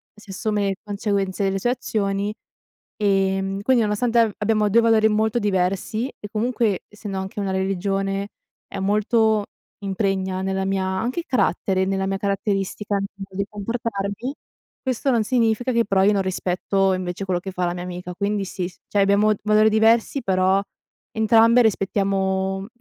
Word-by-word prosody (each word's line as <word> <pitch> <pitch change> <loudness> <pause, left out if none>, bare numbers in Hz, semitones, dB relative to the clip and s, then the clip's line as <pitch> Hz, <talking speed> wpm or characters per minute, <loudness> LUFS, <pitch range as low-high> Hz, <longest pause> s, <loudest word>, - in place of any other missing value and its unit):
si 210 -1 -17
assume 210 0 -1
le 195 - -1
conseguenze 200 -2 -1
delle 195 0 -1
sue 240 - 0
azioni, 205 -5 -1 0.7
ehm, 195 -1 +1
quindi 250 0 +3
nonostante 225 +3 +1
a 225 -3 +4
abbiamo 210 0 +2
2 230 - +5
valori 225 -1 +4
molto 220 +2 +1
diversi 200 +3 0
e 210 - -8
comunque, 225 -2 0
essendo 205 -2 -6
anche 190 +2 -6
una 195 -1 -1
religione, 195 +1 -1 0.4
è 195 - -7
molto 215 +2 +2 0.4
impregna 190 -1 -1
nella 190 0 -1
mia 195 0 0
anche 225 - -1
il - - -10
carattere, 190 -6 +1
nella 190 0 -1
mia 195 0 -1
caratteristica 200 0 -1
mo 195 - -2 0.3
di 200 - 0
comportarmi, 210 +3 -3 0.5
questo 260 +1 0
non 230 -3 +3
significa 235 +1 +1
che 230 0 +3
però 195 -2 +2
io 210 - +5
non 195 -1 +1
rispetto 190 +1 0
invece 185 +1 -4
quello 185 -2 0
che 190 - -6
fa 180 -1 -1
la 175 - -1
mia 175 - -5
amica, 180 0 -6
quindi 200 +1 -1
sì, 180 -1 -4
s 180 - -18
cioè 205 - +1
abbiamo 200 +2 +4
valori 215 0 +5
diversi 225 +4 +3
però 190 -1 +2 0.5
entrambe 225 +2 +5
rispettiamo, 195 -2 0
mhmm, 195 - -7
200 Hz, 165 wpm, -22 LUFS, 190-220 Hz, 0.7 s, 2